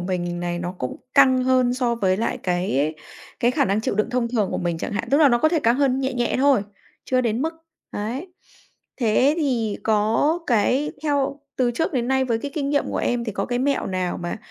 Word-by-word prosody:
mình 175 -1 -3
này 175 0 -2
nó 175 0 -4
cũng 125 - -4 0.2
căng 260 -2 +5
hơn 255 -1 +3
so 245 -2 0
với 190 -5 +1
lại 230 +4 -2
cái 175 -5 0 0.5
cái 240 - +3
khả 280 +2 +1
năng 200 -2 +1
chịu 220 - -2
đựng 215 +3 0
thông 250 -1 0
thường 220 -5 0
của - - -2
mình 170 -2 -2
chẳng - - -4
hạn, 215 +3 -3
tức 280 - +4
là 300 - +6
nó 240 -2 +3
có 315 - +3
thể 325 -1 +1
căng 235 -2 +3
hơn 270 -2 +2
nhẹ 265 0 -1
nhẹ 240 -1 0
thôi, 270 -6 +4 0.4
chưa 255 -1 +1
đến 235 0 0
mức, 320 +2 -2 0.4
đấy. 255 - -4 0.6
Thế 255 +5 +3
thì 235 -9 0
có 220 +9 +2
cái 250 +6 +1
theo 285 -2 0 0.2
từ 250 -2 +2
trước 320 +9 -1
đến 245 -3 -1
nay 265 0 +2
với 230 -3 0
cái 285 +5 -5
kinh 280 -3 -1
nghiệm 285 -1 +1
của - - -3
em 240 -1 0
thì 220 - -4
có - - -2
cái 245 0 -1
mẹo 275 +2 0
nào 185 -1 -2
mà 175 - -3
245 Hz, 230 wpm, -23 LUFS, 210-270 Hz, 0.6 s, là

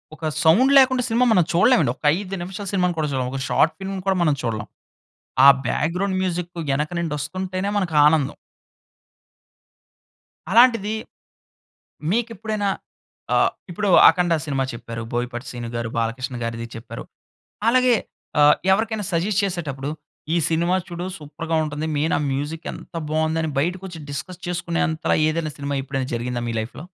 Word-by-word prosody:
ఒక 160 - -7 0.2
సౌండ్ 205 +12 +5
లేకుండా 260 -2 +5
సినిమా 240 +2 +2
మనం 180 -5 +5
చూడలేమండి. 185 - +4
ఒక్క 150 - -12
5 195 -1 -5
నిమిషాల 190 +3 -6
సినిమాను 180 -2 +1
కూడా 150 - 0
చూడం. 130 -2 -1
ఒక 135 - -4
షార్ట్ 160 0 +3
ఫిల్మ్‌ని 190 -1 -5
కూడా 190 -1 +2
మనం 155 -4 +3
చూడలం. 110 -2 -3 0.8
ఆ - - +9 0.2
బ్యాక్‌గ్రౌండ్ 185 +7 0
మ్యూజిక్కు 175 -2 -3
యెనక 150 +3 0
నుండొస్తుంటేనే 185 +5 -3
మనకానందం. 155 -6 +3 2.2
అలాంటిదీ, 230 -1 +5 1.2
మీకిప్పుడైనా 220 -2 -1 0.7
ఆహ్, - - +4 0.2
ఇప్పుడు 205 +4 -1 0.2
'అఖండ' 175 -2 +3
సినిమా 135 -3 -1
చెప్పారు. 115 0 -7
'బోయపాటి 120 +1 -3
శ్రీను'గారు, 115 -1 -4
'బాలకృష్ణ'గారిది 115 0 -3
చెప్పారు. 115 - -8 0.6
అలాగే, 250 0 +5 0.5
ఆహ్, 150 0 +7 0.2
ఎవరికైనా 215 0 0
సజెస్ట్ 190 +5 +1
చేసేటప్పుడు, 150 -8 -3 0.5
ఈ - - +3
సినిమా 170 +3 +1
చూడు 175 0 -5
సూపర్‌గా 160 +2 -4
ఉంటుంది. 150 0 -3
మెయినా 150 +3 +1
మ్యూజిక్ 145 +4 -4
ఎంత - - -12 0.2
బావుందని 160 +1 0
బయటకొచ్చి 175 +2 -3
డిస్కస్ 170 +6 -6
చేసుకునేంతలా 170 -2 0
ఏదైనా 155 -1 -1
సినిమా 140 0 -3
ఎప్పుడైనా 135 -1 -3
జరిగిందా 120 0 -2
మీ - - -2
లైఫ్‌లో? 115 +9 -6
165 Hz, 130 wpm, -22 LUFS, 140-190 Hz, 2.2 s, ఆ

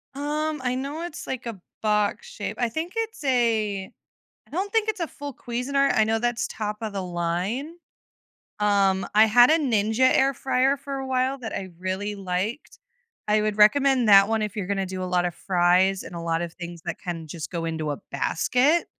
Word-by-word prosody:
Um, 300 +1 -2
I 250 0 0
know 280 +5 -4
it's 345 - -7
like 255 -2 -5
a 225 -5 -6 0.2
box 210 - 0
shape. - - -6
I 240 - +1
think 320 +8 -4
it's 450 -7 -3
a 225 -7 +1 0.6
I - - -26
don't 380 +6 -2
think 445 -1 +2
it's 435 -3 -1
a 335 - -1
full 285 -2 -8
Cuisinart, 275 +3 0
I 220 - +5
know 220 +1 +1
that's 240 0 -1
top 210 -1 -4
of 220 -2 -4
the 195 - -3
line. 180 - -2 0.9
Um, 195 -2 +2
I 215 - +8
had 240 +3 +6
a 320 - +5
Ninja 240 -3 +2
air 270 +1 +3
fryer 265 +2 +1
for 275 0 -6
a 270 0 -4
while 260 +1 0
that 225 -3 -6
I 190 -1 -4
really 190 +3 -3
liked. 195 +7 -4 0.5
I 210 0 +3
would 215 -1 -1
recommend 260 +3 +5
that 195 0 +8
one 225 -1 +1
if 210 0 -3
you're 200 -3 -3
gonna 195 -1 -1
do 185 0 -5
a - - -2
lot 180 -1 +1
of 175 -1 -3
fries 185 +1 +2
and 175 - -9
a - - -4
lot 165 0 -1
of 170 -1 -5
things 170 -2 -8
that 170 - -4
can 165 -3 -5
just 160 +2 -7
go 165 -1 -3
into 160 -2 -2
a 145 - -4
basket. 250 - +2
220 Hz, 205 wpm, -25 LUFS, 190-270 Hz, 0.9 s, I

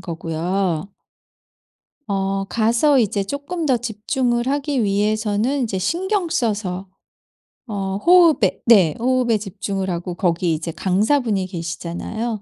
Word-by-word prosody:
거고요. 175 +2 -2 1.2
어 195 0 -1
가서 235 +6 +3
이제 205 -3 +1
쪼끔 285 - -4
더 260 -3 +3
집중을 240 +2 -1
하기 280 -3 0
위해서는 215 +5 0
이제 210 -5 -2
신경 360 - -1
써서 200 - -2 0.8
어 195 -3 -3
호흡에 330 - +4
네 190 -10 +5
호흡에 245 -2 +2
집중을 195 -1 -4
하고 175 0 -4
거기 170 -1 +1
이제 160 +1 -3
강사분이 205 - +1
계시잖아요. 180 +6 -4
210 Hz, 250 characters per minute, -21 LUFS, 190-245 Hz, 1.2 s, 네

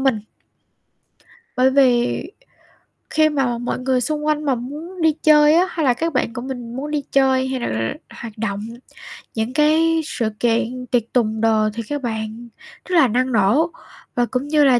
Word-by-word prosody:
mình. 265 -6 +1 1.4
Bởi 255 +1 +4
vì 255 -3 +3 0.9
khi 310 0 +4
mà 265 -5 0
mọi 245 +1 -3
người 255 0 0
xung 300 +3 -2
quanh 305 0 0
mà 275 -3 +2
muốn 300 +9 -7
đi 320 -1 +4
chơi 300 0 +6
á, 350 +3 +4
hay 320 - -2
là 250 - +4
các 330 +6 -2
bạn 255 -3 0
của 240 - -5
mình 245 -3 -6
muốn 290 +3 -4
đi 295 -1 -1
chơi, 265 -1 +3
hay 260 -1 -3
l - - -7
là 115 +1 -2 0.3
hoạt 225 -2 -8
động, 205 -2 -2 0.8
những 225 +3 -2
cái 320 +2 +3
sự 230 -7 -2
kiện 240 +2 0
tiệc 240 -3 +2
tùng 220 -3 +1
đồ 220 -1 +3
thì 230 - -4
các 290 -1 -2
bạn 220 -1 -5 0.4
rất 365 - -2
là 310 -6 +6
năng 255 +3 0
nổ 235 - +2 0.4
và 245 - +2
cũng 255 +3 -3
như 300 0 +3
là 260 -3 +5
255 Hz, 185 wpm, -20 LUFS, 235-300 Hz, 1.4 s, chơi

